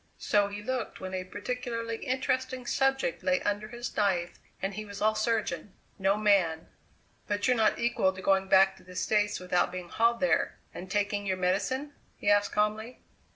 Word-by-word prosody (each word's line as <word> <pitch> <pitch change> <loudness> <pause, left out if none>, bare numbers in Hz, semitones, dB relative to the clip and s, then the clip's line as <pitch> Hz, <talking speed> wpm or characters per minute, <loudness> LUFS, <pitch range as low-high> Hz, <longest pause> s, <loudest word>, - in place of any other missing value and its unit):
So 205 -2 +2
he 205 +1 -7
looked 255 0 -3
when 190 0 -6
a 185 -1 -2
particularly 230 +3 -4
interesting 260 0 -2
subject 270 -7 +1
lay 185 0 +2
under 205 +1 -1
his 240 +2 -6
knife 180 -4 0 0.2
and 195 +1 -2
he 215 +2 -5
was 205 -1 -9
all 215 +1 +3
surgeon 215 -5 -1 0.2
no 195 +1 +2
man. 190 -7 +2 0.6
"But 205 +2 0
you're 250 - +4
not 220 -2 +3
equal 235 -5 +2
to 190 - -10
going 190 0 +2
back 190 0 +5
to - - -18
the 180 0 -13
States 210 +2 +1
without 180 -1 +1
being 180 -1 -6
hauled 235 +1 +2
there 275 - +1 0.2
and 185 - -8
taking 205 0 -1
your 190 -1 0
medicine?" 205 +11 -1 0.2
he 205 - +2
asked 205 0 +3
calmly. 215 +3 -1
205 Hz, 180 wpm, -29 LUFS, 190-230 Hz, 0.6 s, back